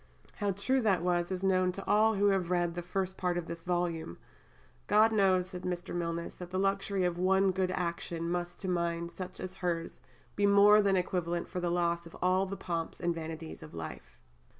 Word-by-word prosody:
How 205 - 0
true 230 +8 +1
that 195 -6 +2
was 175 -1 +1
is 185 0 -3
known 185 -1 +3
to 195 - -7
all 220 +1 +4
who 200 +1 +3
have 190 -3 +1
read 175 -1 +1
the 175 - -4
first 190 +1 -3
part 180 -1 0
of 175 - -3
this 170 0 -6
volume. 175 - -2 0.7
"God 215 +2 +5
knows," 190 -4 +3
said 180 -2 -7
Mr. 180 -1 -4
Milnes, 170 -1 -3
"that 180 -1 -8
the 185 - -3
luxury 195 0 0
of 175 -1 -1
one 190 +1 +3
good 185 0 0
action 170 -2 -3
must 175 0 -3
to 190 - -3
a - - +1
mind 170 -1 -1
such 185 -1 -7
as 185 - -5
hers 175 -3 -3 0.3
be 205 0 +3
more 205 +1 +7
than 195 -2 +3
equivalent 175 -1 -1
for 180 - -4
the 175 -1 -1
loss 170 -1 0
of 165 - -12
all 185 +1 +2
the 195 +1 -5
pomps 165 -2 -4
and 175 -1 0
vanities 160 -1 -7
of 80 +1 -11
life." 65 -7 -8
180 Hz, 210 wpm, -31 LUFS, 170-195 Hz, 0.7 s, more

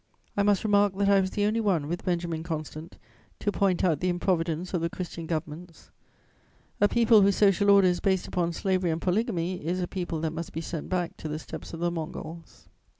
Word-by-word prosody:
I 205 - +2
must 200 -1 +2
remark 205 -2 +3
that 200 0 +2
I 200 -1 +6
was 190 - -1
the 205 +1 0
only 220 +2 +1
one, 180 -9 +1
with 175 +3 -4
Benjamin 170 -2 -1
Constant, 160 0 -6 0.4
to 205 - -1
point 195 -3 +1
out 165 -6 +2
the 180 - 0
improvidence 175 -1 -1
of 175 - 0
the 170 - 0
Christian 170 -2 -6
governments: 165 +1 -6 0.9
a 205 - +6
people 230 -1 +5
whose 200 0 +4
social 200 0 +4
order 200 -2 +7
is 180 -1 +1
based 190 -2 0
upon 175 -1 -1
slavery 185 +1 0
and 160 0 -1
polygamy 185 - -1
is 175 +4 -1
a 180 - -1
people 175 -4 -3
that 160 -1 -2
must 165 0 -6
be 160 - -3
sent 165 -1 -5
back 180 -2 -2
to - - -6
the 155 0 -3
steppes 155 - -8
of 165 - -7
the 175 0 +1
Mongols. 165 0 -7
180 Hz, 210 wpm, -27 LUFS, 165-195 Hz, 0.9 s, order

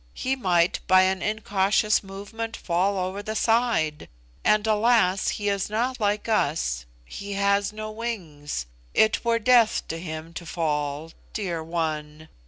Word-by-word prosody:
He 265 +1 -1
might, 180 -8 +2
by 185 0 +6
an 190 0 +1
incautious 210 0 +1
movement, 205 +4 -6
fall 190 +3 0
over 185 +2 -2
the 215 +1 -5
side; 225 -10 +1 0.3
and 210 0 +3
alas; 215 -3 +3
he 205 - -3
is 200 -1 0
not 245 +4 -1
like 210 0 0
us, 140 - 0 0.2
he 200 - -7
has 200 0 +2
no 215 0 -6
wings. 170 - -5 0.3
It 220 +1 +3
were 235 -1 +2
death 230 -1 +4
to 165 - -3
him 160 -1 -7
to 170 - -7
fall. 150 -1 -2 0.2
Dear 175 -6 -2
one!" 155 -2 -3
200 Hz, 145 wpm, -25 LUFS, 165-215 Hz, 0.3 s, by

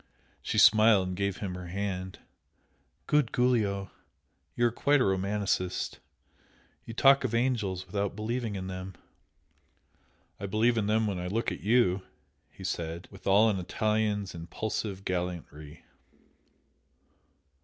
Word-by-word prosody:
She - - -3
smiled 105 -3 +6
and 90 - -4
gave 100 0 -1
him 95 -3 -4
her 90 -1 -7
hand. 95 0 -4 0.9
"Good 150 -5 +2
Giulio! 105 -7 +1 0.6
you 120 - +2
are 120 - +3
quite 145 +5 +2
a - - +3
romancist! 95 -1 -1 0.9
you 115 - -8
talk 135 +2 +5
of 120 -3 -1
angels 105 -7 0
without 100 +1 -2
believing 110 +1 -3
in 95 -1 -4
them!" 95 0 -6 1.4
"I 100 - -4
believe 110 +4 +2
in 105 - -1
them 110 +1 +2
when 100 -4 -2
I 90 - -4
look 110 +5 -1
at - - -5
YOU!" 105 -4 +3 0.5
he 95 - -13
said, 85 -1 -4
with 95 -2 -11
all 100 +3 +6
an 95 - -2
Italian's 105 +1 -1
impulsive 95 +3 -4
gallantry. 85 -4 -5
100 Hz, 135 wpm, -29 LUFS, 95-110 Hz, 1.4 s, smiled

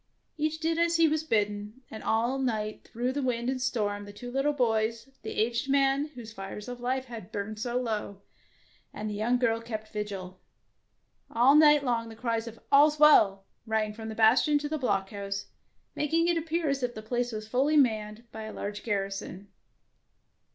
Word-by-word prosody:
Each 310 +1 -1
did 325 +1 0
as 340 0 +2
he 330 -1 +5
was 310 0 0
bidden, 210 -2 -1
and 220 - -7
all 235 +4 +1
night 215 -5 -2
through 245 +2 -1
the 285 +2 -2
wind 250 -1 0
and 260 -1 -3
storm 205 -5 -1
the 205 - -9
two 245 +4 -8
little 270 +3 +1
boys, 230 -3 0
the - - -6
aged 235 +4 -1
man 275 +1 +3
whose 225 -3 -9
fires 195 +1 -7
of 245 0 -6
life 255 +2 -1
had 230 -7 -9
burned 210 +1 -4
so 240 +2 -1
low, 210 -4 -4 0.7
and 210 - -5
the 210 - -3
young 225 +4 +1
girl 230 -2 +1
kept 220 -2 -6
vigil. 195 -3 -5 0.9
All 245 +4 +5
night 295 -1 +6
long 230 -3 -1
the 225 - -10
cries 230 0 -2
of 230 0 -9
All 285 +2 +7
's 300 - -6
well 205 -10 +6
" - - -47
rang 220 -1 0
from 220 +1 -7
bastion 225 +7 +4
to 295 - -3
blockhouse, 200 -7 -2 0.5
mak 295 - -2
ing 330 +1 +3
it 345 - +2
appear 330 0 -1
as 275 -1 0
if 245 -1 -2
the 215 - -7
place 245 +2 -1
was 215 -1 -6
fully 275 +7 +2
manned 220 -4 +1
by 220 0 -7
a 215 - -7
large 205 +1 -5
garrison. 195 -2 -4
230 Hz, 190 wpm, -28 LUFS, 215-270 Hz, 0.9 s, All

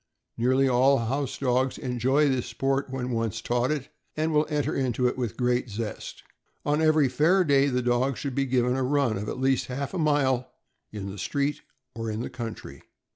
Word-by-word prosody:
Nearly 130 +3 +2
all 130 +2 +4
house 130 +3 -2
dogs 130 0 +1
enjoy 130 +4 +1
this 130 -3 0
sport 135 +1 -1
when 130 -1 -3
once 115 -1 -1
taught 120 +2 0
it, 145 -3 -2 0.3
and 155 +1 0
will 150 0 +3
enter 150 -2 0
into 125 -2 0
it 125 - -1
with 120 -4 -3
great 125 0 0
zest. 105 +1 -6 0.4
On 150 +1 +1
every 155 -3 +4
fair 160 +9 +3
day 140 -3 +3
the 125 -2 0
dog 125 +2 +1
should 140 -3 -4
be 135 +1 0
given 125 0 +2
a 135 - -1
run, 135 -3 +1
of 100 +2 -4
at - - -5
least 130 0 +1
half 135 +4 -4
a 185 - -2
mile, 135 -5 +1 0.4
on 105 -2 -6
the 100 0 -7
street 140 +7 -1 0.3
or 115 -1 -4
in 110 +1 -3
the - - -5
country. 115 - -7
130 Hz, 195 wpm, -26 LUFS, 120-140 Hz, 0.4 s, all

